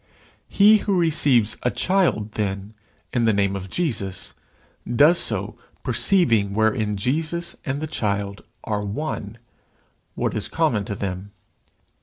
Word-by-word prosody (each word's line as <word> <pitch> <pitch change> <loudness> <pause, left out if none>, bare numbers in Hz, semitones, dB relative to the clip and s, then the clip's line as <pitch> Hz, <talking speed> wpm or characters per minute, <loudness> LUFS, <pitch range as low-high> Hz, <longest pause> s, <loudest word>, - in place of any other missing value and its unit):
He 210 +2 +6
who 195 -3 0
receives 140 -9 +2
a 125 - +1
child, 175 - +1
then, 100 0 -3 0.4
in 120 -2 +2
the 110 - +4
name 100 -1 +1
of 95 -1 -6
Jesus, 110 - -3 0.6
does 155 +7 +6
so, - - -3 0.2
perceiving 115 - +2
wherein 110 -1 +1
Jesus 160 +10 -2
and 135 +1 -1
the 155 - -3
child 100 -7 -2 0.2
are 105 -1 -2
one, 105 -1 -4 0.8
what - - -1
is 105 - -2
common 140 -12 0
to 100 - -4
them. 95 +1 -5
110 Hz, 130 wpm, -23 LUFS, 100-155 Hz, 0.8 s, He